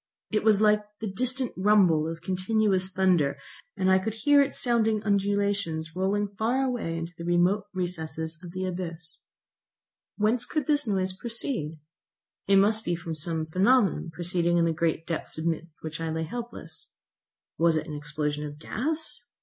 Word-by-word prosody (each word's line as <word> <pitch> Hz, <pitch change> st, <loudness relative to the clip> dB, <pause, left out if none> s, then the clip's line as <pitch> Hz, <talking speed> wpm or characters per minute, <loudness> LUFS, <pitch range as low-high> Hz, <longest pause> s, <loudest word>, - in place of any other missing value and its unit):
It 215 Hz, -, +1 dB
was 215 Hz, -2 st, +5 dB
like 210 Hz, 0 st, +4 dB, 0.2 s
the 220 Hz, -, -4 dB
distant 255 Hz, +3 st, +1 dB
rumble 185 Hz, -6 st, +4 dB
of 165 Hz, 0 st, -6 dB
continuous 190 Hz, 0 st, +1 dB
thunder, 180 Hz, -7 st, +2 dB, 0.4 s
and 190 Hz, -1 st, +2 dB
I 190 Hz, -, +5 dB
could 220 Hz, +3 st, -3 dB
hear 285 Hz, +6 st, +5 dB
its 280 Hz, 0 st, +1 dB
sounding 225 Hz, -4 st, +2 dB
undulations 200 Hz, -5 st, 0 dB
rolling 200 Hz, +2 st, 0 dB
far 245 Hz, +5 st, +2 dB
away 240 Hz, -11 st, -2 dB
into 165 Hz, +1 st, -5 dB
the 170 Hz, -, -8 dB
remote 175 Hz, +4 st, +2 dB
recesses 160 Hz, -3 st, -4 dB
of 175 Hz, -, -9 dB
the 185 Hz, +1 st, -3 dB
abyss. 175 Hz, -2 st, -5 dB, 1.0 s
Whence 220 Hz, +3 st, +1 dB
could 305 Hz, -4 st, -1 dB
this 295 Hz, -3 st, +1 dB
noise 190 Hz, -2 st, 0 dB
proceed? 225 Hz, -, -3 dB, 0.7 s
It 195 Hz, -, +5 dB
must 215 Hz, +3 st, +3 dB
be 175 Hz, -, 0 dB
from 170 Hz, -1 st, -5 dB
some 160 Hz, +1 st, -2 dB
phenomenon 195 Hz, +4 st, +3 dB
proceeding 175 Hz, 0 st, 0 dB
in 170 Hz, -, +4 dB
the 165 Hz, -, +1 dB
great 165 Hz, 0 st, 0 dB
depths 165 Hz, -1 st, -4 dB
amidst 165 Hz, 0 st, -3 dB
which 160 Hz, 0 st, -5 dB
I 165 Hz, -, -2 dB
lay 160 Hz, 0 st, -2 dB
helpless. 240 Hz, +9 st, -7 dB, 0.7 s
Was 165 Hz, -1 st, +4 dB
it 155 Hz, -, -2 dB
an 155 Hz, -, -7 dB
explosion 150 Hz, 0 st, -2 dB
of 145 Hz, -1 st, -6 dB
gas? 275 Hz, -, -2 dB
185 Hz, 165 wpm, -27 LUFS, 165-215 Hz, 1.0 s, was